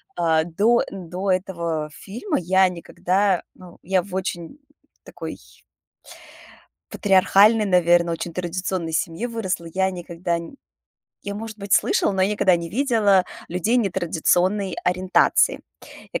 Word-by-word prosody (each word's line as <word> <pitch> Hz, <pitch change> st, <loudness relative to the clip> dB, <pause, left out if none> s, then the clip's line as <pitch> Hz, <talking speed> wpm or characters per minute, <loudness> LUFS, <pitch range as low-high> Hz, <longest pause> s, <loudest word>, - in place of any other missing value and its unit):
А 160 Hz, -2 st, +2 dB
до, 205 Hz, +9 st, +2 dB
э, -, -, -2 dB
до 185 Hz, +1 st, -4 dB
этого 170 Hz, -4 st, -2 dB
фильма 235 Hz, -, -4 dB
я 190 Hz, +2 st, +3 dB
никогда, 180 Hz, +2 st, 0 dB
ну, 180 Hz, -2 st, -14 dB
я 185 Hz, 0 st, 0 dB
в 200 Hz, -, -13 dB
очень 185 Hz, -, -4 dB, 0.4 s
такой -, -, -8 dB, 1.5 s
патриархальной, 205 Hz, +2 st, +4 dB
наверно, 175 Hz, -2 st, +3 dB
очень 165 Hz, 0 st, -4 dB
традиционной 180 Hz, -1 st, -3 dB
семье 165 Hz, +8 st, -2 dB
выросла. 195 Hz, -7 st, -3 dB
Я 190 Hz, 0 st, +1 dB
никогда 170 Hz, -1 st, -3 dB
нь 170 Hz, +10 st, -10 dB, 0.7 s
я 200 Hz, -, -5 dB
может 220 Hz, +1 st, -7 dB
быть 200 Hz, -1 st, -6 dB
слышала, -, -, +3 dB
но 190 Hz, -, 0 dB
я 190 Hz, -, +2 dB
никогда 195 Hz, -3 st, +3 dB
не 170 Hz, -1 st, -4 dB
видела 215 Hz, -5 st, +3 dB, 0.2 s
людей 185 Hz, +8 st, 0 dB
нетрадиционной 190 Hz, -1 st, 0 dB
ориентации. 185 Hz, +1 st, +2 dB, 0.5 s
Я, -, -, -2 dB
185 Hz, 130 wpm, -22 LUFS, 170-200 Hz, 1.5 s, патриархальной